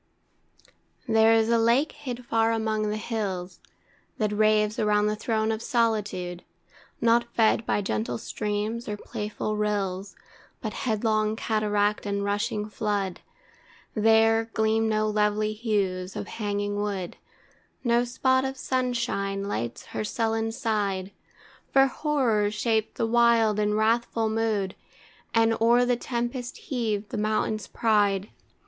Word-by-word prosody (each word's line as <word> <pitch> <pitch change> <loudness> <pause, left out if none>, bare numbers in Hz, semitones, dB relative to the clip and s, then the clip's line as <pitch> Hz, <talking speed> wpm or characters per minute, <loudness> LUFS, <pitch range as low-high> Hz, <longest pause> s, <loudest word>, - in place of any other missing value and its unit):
There 220 0 +5
is 225 0 +3
a 235 0 +4
lake 235 +7 +3
hid 250 -4 -7
far 225 -1 +2
among 220 -1 0
the 210 - -2
hills, 195 -5 -4 0.6
That 215 -2 0
raves 215 0 +2
around 210 -1 +3
the 210 0 +1
throne 220 0 0
of 220 0 -3
solitude, 210 -7 -1 0.6
Not 235 0 +3
fed 225 0 +3
by 205 - +1
gentle 115 - -2
streams, 210 - -3
or 210 - -3
playful 210 +1 -4
rills, 200 -2 -2 0.4
But - - -4 0.2
headlong 215 0 +1
cataract 210 -2 0
and 200 0 -1
rushing 210 +1 -1
flood. 205 -3 -2 0.7
There, 225 +1 +4
gleam 220 0 +2
no 215 0 +1
lovely 210 0 +1
hues 195 -4 -1
of - - -4
hanging 205 -1 -2
wood, 195 -4 -3 0.7
No 240 -1 +3
spot 260 +2 +1
of 265 0 -3
sunshine 235 -7 -1
lights 120 - -4
her - - -2
sullen 225 +1 -1
side; 200 -4 -1 0.6
For 270 0 +6
horror 255 -7 +1
shaped 220 +1 -1
the 230 - +1
wild 230 -2 +3
in 210 0 +1
wrathful 225 +1 +1
mood, 215 -4 0 0.6
And 225 0 +4
o'er 240 +2 +5
the 245 0 +2
tempest 240 +1 -4
heaved 220 -7 -2
the - - -4
mountain's 215 -1 -1
pride. 205 -3 +1
215 Hz, 130 wpm, -26 LUFS, 205-230 Hz, 0.7 s, For